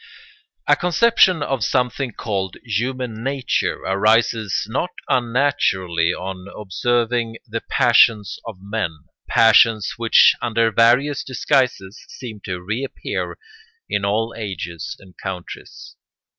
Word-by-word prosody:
] 425 0 -40
A - - +6
conception 185 -2 +3
of 135 -6 -2
something 125 +3 0
called 95 -4 -4
human 120 0 -3
nature 135 -1 -1
arises 110 +1 +1
not 130 +10 -2 0.2
unnaturally 115 -10 +1
on 95 +1 -6
observing 115 +3 -1
the 115 -1 -4
passions 115 -5 +3
of 110 -4 -7
men, 100 0 -2 0.4
passions 115 -2 +4
which 115 -1 +6
under 115 -1 +1
various 125 +6 +3
disguises 125 -3 -1
seem 115 -5 -9
to 90 -1 -4
reappear 110 +8 -4 0.5
in 100 - -1
all 110 +3 0
ages 85 - -6
and 95 -2 -17
countries. 90 -2 -8
115 Hz, 110 wpm, -20 LUFS, 100-125 Hz, 0.5 s, A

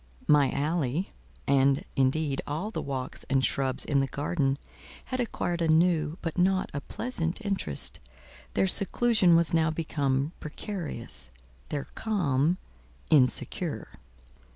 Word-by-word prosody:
My 145 -2 +5
alley, 150 +3 -1 0.4
and, 135 0 +3
indeed, 135 +1 +1
all 160 +9 -3
the - - -3
walks 130 -2 -4
and 135 -1 +3
shrubs 130 -2 0
in 140 -2 +2
the 135 - +1
garden, 140 -1 0 0.5
had 255 - -3
acquired 175 -7 -1
a 165 - +2
new, 160 -1 +3
but 165 +1 -2
not 185 +1 +2
a 140 - -3
pleasant 170 - -2
interest; 190 - 0 0.6
their - - +3
seclusion 200 -1 +3
was 170 -1 +2
now 160 -1 +3
become 145 -3 0
precarious; 150 - -6 0.4
their 140 - -3
calm—insecure. 135 - 0
155 Hz, 120 wpm, -28 LUFS, 135-175 Hz, 0.6 s, My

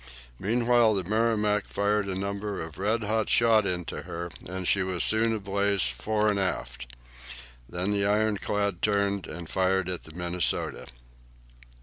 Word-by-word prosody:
Meanwhile 115 +1 +3
the 95 - -1
"Merrimac" 105 0 +1
fired 100 0 0
a 95 -1 -2
number 100 +1 -3
of 80 +1 -7
red 110 +3 0
hot 110 +1 0
shot 110 -3 +4
into 90 -2 -3
her, 85 +1 -6 0.2
and 95 -1 -4
she 100 - +3
was 95 -2 -1
soon 110 +1 +4
ablaze 100 -2 0
fore 105 - -1
and 100 - -1
aft. - - -3 0.7
Then 90 +3 -2
the 100 -1 +1
ironclad 105 -2 0
turned 100 -2 +1
and 85 +1 -7
fired 95 0 +1
at 90 -2 -5
the 80 - -12
"Minnesota." 90 +1 -1
100 Hz, 145 wpm, -27 LUFS, 90-105 Hz, 0.7 s, shot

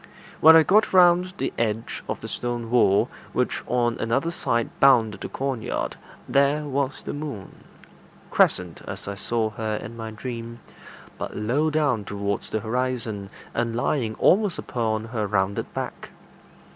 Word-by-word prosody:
When 160 +1 +9
I 160 - +8
got 210 +5 +3
round 180 0 +5
the - - -2
edge 115 0 -2
of - - -3
the - - -6
stone 120 -1 -4
wall, 100 -5 +4 0.3
which - - 0
on 120 -1 +1
another 135 +9 0
side 115 -8 -1
bounded 115 -7 +4
the - - -5
corn 135 -3 -3
yard, - - -3 0.3
there 140 +2 +3
was 140 0 -2
the - - -4
moon 145 -10 -7 0.7
crescent, 90 -3 +2
as 100 0 -6
I 100 - -3
saw 110 +2 -1
her 110 -1 -3
in 115 +2 -7
my 115 -1 -6
dream, 115 +1 -6 0.6
but - - -5
low 130 +9 +1
down 145 -8 +1
towards 100 0 -3
the 110 - -2
horizon, 115 -3 -2 0.2
and 115 -1 -1
lying 120 -2 0
almost 205 -2 +3
upon 110 -2 -2
her 110 -2 -2
rounded 100 -1 -1
back. - - -5
115 Hz, 155 wpm, -24 LUFS, 110-140 Hz, 0.7 s, When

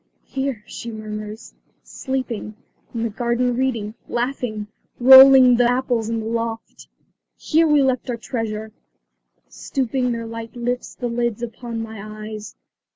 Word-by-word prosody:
"Here," 265 -5 -3
she 235 - -7
murmurs, 215 0 -7 0.3
"sleeping; 250 -5 -4 0.4
in 230 -1 -3
the 230 - -1
garden 240 +2 0
reading; 235 -5 -1 0.2
laughing, 240 -4 -2 0.3
rolling 260 -1 +9
apples 245 -2 +1
in 230 -1 -1
the - - -6
loft. 230 0 -4 0.5
Here 325 +1 +2
we 295 -2 +4
left 260 -1 0
our 240 - -2
treasure 220 -2 -4 0.5
" - - -49
Stooping, 260 -2 -2
their 230 -1 -3
light 230 +1 -8
lifts 245 +1 -3
the 250 - -5
lids 235 -1 -2
upon 230 -1 -5
my 220 -2 -8
eyes. 215 0 -8
235 Hz, 135 wpm, -21 LUFS, 220-255 Hz, 0.5 s, rolling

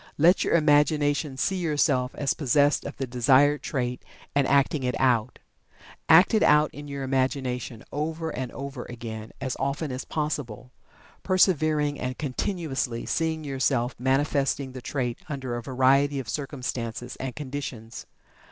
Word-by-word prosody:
Let 170 +5 +5
your - - +2
imagination 150 -2 +2
see 190 +7 0
yourself 145 -6 +1
as 140 -2 0
possessed 145 0 +2
of 140 - -6
the 135 - -2
desired 135 +4 +3
trait, 125 -3 -3 0.3
and 140 -1 +2
acting 140 +1 +2
it 125 -1 -2
out. 125 -3 +2 0.7
Act 180 +8 +7
it 220 - +3
out 150 +1 +4
in 145 0 -9
your 140 -1 -5
imagination, 130 -3 -2
over 160 +2 -3
and 130 -1 -4
over 140 -2 -6
again, 115 -2 -7
as 130 -2 -3
often 140 +2 -2
as 130 +1 -4
possible, 130 -6 -4 0.5
persevering, 155 -6 +2
and 125 0 -3
continuously, 135 -4 -2
seeing 160 -1 -1
yourself 130 -3 0
manifesting 135 +1 0
the 130 0 -8
trait 125 -2 -3
under 130 -4 -4
a 120 - -4
variety 135 +3 +2
of 130 -4 -4
circumstances 125 -2 -4
and 130 -2 -5
conditions. 130 -6 -6
135 Hz, 145 wpm, -26 LUFS, 125-150 Hz, 0.7 s, Act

